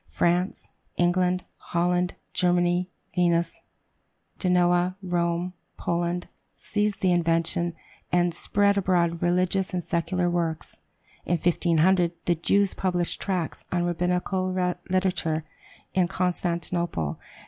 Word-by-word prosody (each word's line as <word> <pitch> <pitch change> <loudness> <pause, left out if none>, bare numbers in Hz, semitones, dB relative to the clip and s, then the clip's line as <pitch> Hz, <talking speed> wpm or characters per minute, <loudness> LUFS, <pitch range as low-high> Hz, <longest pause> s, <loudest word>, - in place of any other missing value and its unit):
France, 175 - 0 0.3
England, 180 +1 +2 0.2
Holland, 180 +1 0 0.2
Germany, 175 -1 +2 0.3
Venice, 170 -1 +1 0.8
Genoa, 180 0 +3
Rome, 175 0 -1 0.2
Poland, 175 +1 -1 0.3
seized 210 -1 -1
the 185 - +3
invention, 170 0 +1 0.4
and 175 -1 +2
spread 200 +4 +2
abroad 170 -3 +1
religious 185 +2 +1
and 175 - -1
secular 175 +2 0
works. 170 -2 -2 0.4
In 175 - +1
1500 175 +1 +3
the 175 - +3
Jews 195 +4 +2
published 180 -2 -1
tracts 180 -5 -2
on 175 -1 +1
Rabbinical 180 +2 0 0.4
literature 180 -4 0 0.5
in 185 -2 +3
Constantinople. 170 - -1
175 Hz, 100 wpm, -26 LUFS, 170-185 Hz, 0.8 s, Genoa